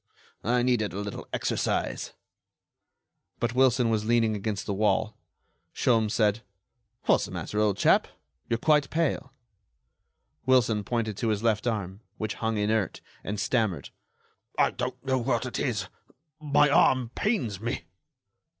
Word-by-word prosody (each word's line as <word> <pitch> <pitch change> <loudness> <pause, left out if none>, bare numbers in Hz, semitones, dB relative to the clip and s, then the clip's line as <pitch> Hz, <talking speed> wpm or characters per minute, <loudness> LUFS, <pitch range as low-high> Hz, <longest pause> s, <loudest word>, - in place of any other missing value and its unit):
I 120 +2 +2
needed 120 -6 +1
a 100 - -4
little 100 0 -6
exercise." - - -1 1.3
But 120 0 -1
Wilson 125 -2 +3
was 110 -1 +1
leaning 115 -1 +2
against 105 0 -3
the 100 - -2
wall. 105 +2 +1 0.6
Sholmes 115 -3 +2
said: 105 0 +2 0.6
"What's - - +3
the - - -9
matter, 90 +4 -3
old 105 -2 +2
chap? - - +4 0.4
You're 115 - +1
quite 150 +2 +3
pale." 155 -4 -1 1.1
Wilson 115 -5 +3
pointed 110 -1 -2
to 115 - -1
his 105 -1 0
left 115 0 +1
arm, 100 -3 -3 0.2
which 110 - -3
hung 110 -1 -2
inert, 105 -1 0 0.2
and 105 +1 -4
stammered: 105 - 0 0.7
"I - - +4
don't - - -5
know 130 -1 +1
what 120 0 0
it 125 - -4
is. 105 -9 -1 0.5
My 150 -1 +4
arm 130 -4 +3
pains 155 - -1
me." 115 -7 -3
110 Hz, 140 wpm, -27 LUFS, 105-125 Hz, 1.3 s, chap